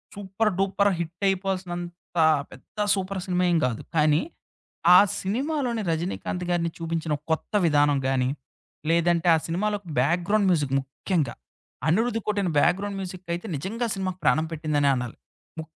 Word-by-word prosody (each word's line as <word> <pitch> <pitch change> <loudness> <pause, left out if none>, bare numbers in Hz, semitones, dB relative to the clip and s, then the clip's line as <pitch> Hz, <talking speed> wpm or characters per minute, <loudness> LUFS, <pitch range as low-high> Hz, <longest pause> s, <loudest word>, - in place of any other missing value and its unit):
Super, 205 +2 -1
duper, 195 +1 +2
hit 170 +3 -5
అయిపోవాల్సినంత 180 -2 -3 0.3
పెద్ద 130 +11 -17 0.2
super 190 0 -3
cinema 180 -2 0
ఏం 170 - +3
కాదు. 120 -3 -2
కానీ, 150 0 +4 0.7
ఆ - - +10 0.2
సినిమాలోని 245 +2 -1
'రజినీకాంత్' 180 +2 -3
గారిని 170 -1 0
చూపించిన 165 -2 -2 0.2
కొత్త 160 - -2
విధానం 145 -3 +3
గాని. 130 -1 +1 0.6
లేదంటే, 170 +1 +2
ఆ - - +3
సినిమాలోకి 205 +2 -2
బ్యాక్‌గ్రౌండ్ 180 +8 +2
మ్యూజిక్ 145 -6 0
ముఖ్యంగా. 135 +1 -2 0.5
'అనిరుధ్' 225 +6 +1
కొట్టిన 200 -4 0
బ్యాక్‌గ్రౌండ్ 195 +5 +1
మ్యూజిక్ 185 -1 -7
అయితే 175 +6 -7
నిజంగా 210 - -4
అసలు 195 - -3
మాకు 185 0 -7
ప్రాణం 155 +1 +3
పెట్టిందనే 150 -2 +1
అనాలి. 125 -2 -4 0.4
ము 160 - -3
175 Hz, 135 wpm, -25 LUFS, 160-195 Hz, 0.7 s, ఆ